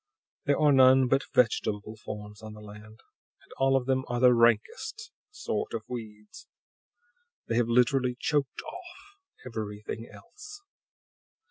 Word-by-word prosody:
There 145 -1 +2
are 150 -1 +5
none 130 -1 +6
but 135 +2 +1
vegetable 110 -3 +1
forms 105 -1 -9
on 110 -1 -9
the 105 - -12
land, 105 +1 -13 0.4
and - - -23
all 135 0 +3
of 130 - -3
them 130 0 +1
are 120 0 -2
the 125 0 +6
rankest 425 - +1 0.2
sort 420 - -4
of 110 - -4
weeds. 105 -3 -9 1.0
They 115 - -1
have 120 -1 +2
literally 125 +1 +2
choked 145 -3 -1
off 385 +3 -12 0.3
everything 110 -1 -6
else! 420 0 -13
125 Hz, 135 wpm, -28 LUFS, 110-140 Hz, 1.0 s, none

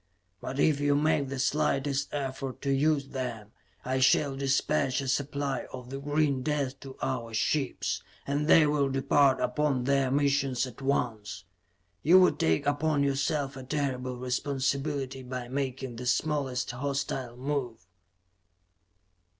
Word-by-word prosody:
But 130 +8 -5
if 150 -1 +3
you 145 0 +2
make 145 -2 +2
the 140 - -4
slightest 140 0 0
effort 135 -2 -4
to 140 - 0
use 140 0 +2
them, 120 -5 -5 0.3
I 130 +1 0
shall 135 +2 +3
dispatch 135 0 +1
a 135 - -4
supply 140 0 -1
of 125 -1 -9
the 135 - -4
green 145 -1 +1
death 140 -1 -1
to 135 -1 -10
our 115 -4 -2
ships, 135 +3 0 0.2
and 145 +2 -1
they 160 -1 +7
will 145 -2 +1
depart 135 0 +3
upon 135 -1 0
their 135 0 +2
missions 140 -2 +1
at 125 0 -10
once. 115 -9 -2 0.6
You 175 +5 +7
would 180 - +4
take 80 - +2
upon 145 0 +1
yourself 140 0 0
a 135 - -7
terrible 130 -2 -2
responsibility 135 +1 -2
by 125 -1 -6
making 130 -2 -3
the 125 +1 -5
smallest 135 -2 0
hostile 130 -2 -3
move. 130 -7 -3
135 Hz, 140 wpm, -29 LUFS, 130-145 Hz, 0.6 s, they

